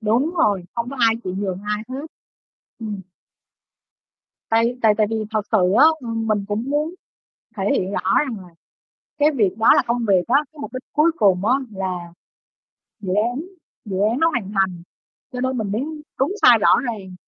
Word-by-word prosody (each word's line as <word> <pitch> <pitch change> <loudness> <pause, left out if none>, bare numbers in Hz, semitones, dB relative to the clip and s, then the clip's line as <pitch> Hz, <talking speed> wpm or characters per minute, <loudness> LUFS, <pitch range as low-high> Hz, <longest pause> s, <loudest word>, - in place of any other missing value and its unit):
Đúng 240 +10 +1
rồi, 205 - +1
không 235 +2 -3
có 275 - -7
ai 225 -1 +4
chịu 185 0 -3
nhường 190 -2 -3
ai 210 +1 -1
hết. 270 +4 -6 0.7
Ừm. 210 -3 -5 1.5
Tại 230 +2 +2
tại 215 -2 +5
tại 215 -1 +3
vì 225 - -2 0.2
thật 215 - 0
sự 185 -4 +3
á, - - +8
ừm, 225 -2 -4
mình 205 -2 0
cũng 210 +2 -2
muốn 300 +4 -1 0.6
thể 195 - -2
hiện 190 +2 -1
rõ 190 - +1
rằng 260 -7 -1
là 180 - -13 0.7
cái 295 +1 +4
việc 210 -9 0
đó 220 - +3
là 280 - +4
công 235 +1 0
việc 190 -3 +4
á, 260 - +4 0.2
cái 310 - -19
mục - - -7
đích 255 0 -6
cuối 305 +3 +4
cùng 195 -3 +3
á 250 - +4 0.2
là 190 -2 -3 1.0
dự 185 -3 -3
án 245 +4 -2 0.4
dự 195 -3 -4
án 240 - -1
nó 330 - +5
hoàn 210 -8 -3
thành 185 -3 0 0.5
cho 250 - -4
nên 260 0 -1
mình 205 -3 -2
đếm 215 - -1 0.4
đúng 275 +8 +1
sai 245 -2 +8
rõ - - +5 0.2
ràng, 190 -4 -8
220 Hz, 190 wpm, -21 LUFS, 195-255 Hz, 1.5 s, á